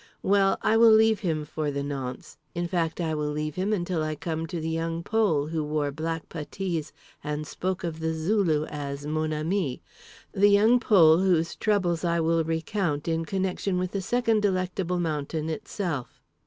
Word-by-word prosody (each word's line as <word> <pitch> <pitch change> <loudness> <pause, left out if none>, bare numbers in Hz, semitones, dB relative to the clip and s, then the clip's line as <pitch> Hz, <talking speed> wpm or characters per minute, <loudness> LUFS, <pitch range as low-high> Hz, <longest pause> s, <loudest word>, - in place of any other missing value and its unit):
Well, 195 0 +3
I 225 - +3
will 230 0 +7
leave 220 -1 +5
him 160 -7 -1
for 150 0 -3
the 140 0 -2
nonce; 135 -3 -6 0.2
in 175 0 -1
fact, 170 -2 -1
I 160 -2 -1
will 150 -1 -1
leave 150 0 -3
him 190 +5 -1
until 175 -4 -1
I 155 0 -2
come 160 +1 -3
to 170 +1 -4
The 160 - -4
Young 165 +1 -2
Pole, 205 -10 +1
who 160 0 -2
wore 150 -1 -1
black 160 +2 -4
puttees 165 +1 -4 0.3
and 150 +1 -3
spoke 185 +4 -3
of 165 -2 -4
The 160 0 -1
Zulu 160 -3 +1
as 145 -1 -5
"mon 155 +1 -1
ami"—the 165 +4 -1
Young 215 +5 +5
Pole 170 -8 +6
whose 175 -3 +2
troubles 185 -6 0
I 170 -1 +1
will 165 0 +2
recount 165 -1 -2
in 165 0 0
connection 190 +1 -1
with 180 0 -1
the 195 - -2
second 225 +1 +1
Delectable 185 -2 0
Mountain 155 -1 -2
Itself. 160 - -4
165 Hz, 175 wpm, -26 LUFS, 155-190 Hz, 0.3 s, will